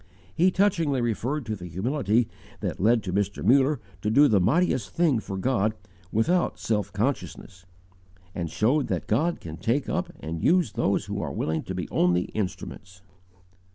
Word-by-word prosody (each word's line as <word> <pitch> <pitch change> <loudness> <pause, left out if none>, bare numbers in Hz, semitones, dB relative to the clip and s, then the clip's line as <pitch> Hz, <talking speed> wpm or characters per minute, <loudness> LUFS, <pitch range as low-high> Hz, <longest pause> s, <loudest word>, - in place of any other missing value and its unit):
"_ - - -27 0.3
He 175 +4 +4
touchingly 170 -8 +2
referred 120 +4 -1
to 110 -1 -3
the 90 -3 -8
humility 115 - 0 0.3
that - - -3
led 115 +4 +3
Mr. 100 +2 -2
Muller 135 +2 +4 0.2
to 105 - 0
do 145 +7 +6
the 105 -6 +4
mightiest 125 - +2
thing 160 -8 +2
for 95 -3 -6
God 110 -1 +1 0.4
without 170 - +1
self 105 -3 -1
consciousness, 100 -4 -3 0.7
and 85 -2 -3
showed 130 - +1
that - - -2
God 170 +3 +1
can 80 -1 -8
take 120 +9 0
up 185 -1 -2
and 80 +1 -5
use 180 +1 +3
those - - 0
who - - -4
are - - -3
willing 80 0 -1
to - - -5
be - - -3
only 90 0 +3
instruments. 95 -2 -5
115 Hz, 165 wpm, -26 LUFS, 95-145 Hz, 0.7 s, do